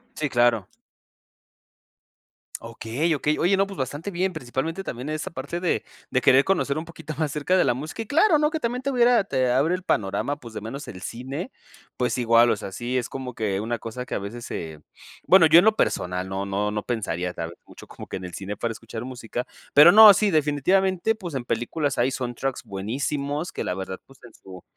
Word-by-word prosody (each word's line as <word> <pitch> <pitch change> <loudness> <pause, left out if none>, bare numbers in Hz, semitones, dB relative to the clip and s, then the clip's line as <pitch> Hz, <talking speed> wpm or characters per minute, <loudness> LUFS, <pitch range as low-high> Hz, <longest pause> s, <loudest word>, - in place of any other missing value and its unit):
Sí, 150 -2 -2
claro. 120 -5 +2 1.9
Okey, 115 +7 -2
okey. 150 +1 0
Oye, 190 +3 +3
no, 195 - +3
pues, 195 -1 -10
bastante 145 +8 -4
bien, 185 +1 -1
principalmente 155 +5 -4
también, 125 -3 -6
en 155 - -2
esta 155 - -5
parte 145 +4 -5
de 175 -1 0 0.3
de 130 - +2
querer 135 +1 +6
conocer 155 -6 0
un 160 - -4
poquito 160 -2 -8
más 155 -1 -2
acerca 150 +6 +1
de - - +4
la - - +2
música. 150 - -6
Y - - -16
claro, 320 - +4
¿no? 300 +1 +2
Que 320 - -2
también 245 -1 -2
te 275 - -1
hubiera, 245 -3 +4
te 130 -8 0
abre 140 +7 +2
el 185 0 -3
panorama, 105 - -1
pues, 115 -4 -11
de 110 - -6
menos 135 +8 -7
el 90 - -9
cine, 135 - -6 0.5
pues, 125 0 0
igual 115 0 +5
o - - +2
sea, 100 - -7
sí 120 +6 -3
es 125 -1 -2
como 130 -2 -6
que 100 -4 -2
una 115 +1 -3
cosa 115 +3 -6
que - - -7
a - - -1
veces 110 +4 -7
se, 80 -2 -6 0.5
bueno 185 -2 +7
yo 160 +2 +8
en 180 - +3
lo 220 0 +4
personal 90 - -1
no 95 +1 -3
no 100 +1 -1
no 105 0 -3
pensaría, 90 -7 -3
tal 80 -1 -5
vez, 85 - -13
mucho - - -14
como - - -11
que - - -5
en 95 - -8
el 90 - -8
cine 100 +1 -5
para 115 - -2
escuchar 115 +1 -7
música, 125 -1 -5 0.3
pero 150 +4 +9
no, 215 0 +10
sí 210 +2 +2
definitivamente, 180 +7 +2
pues, 180 -7 -8
en 125 -2 -3
películas 135 +6 -2
hay 125 +3 +2
soundtracks 130 +1 -3
buenísimos 140 - -3
que - - -4
la - - -2
verdad 95 0 -6
pues, 135 -1 -20
en 120 -2 -14
su 95 -2 -13
130 Hz, 220 wpm, -24 LUFS, 115-165 Hz, 1.9 s, no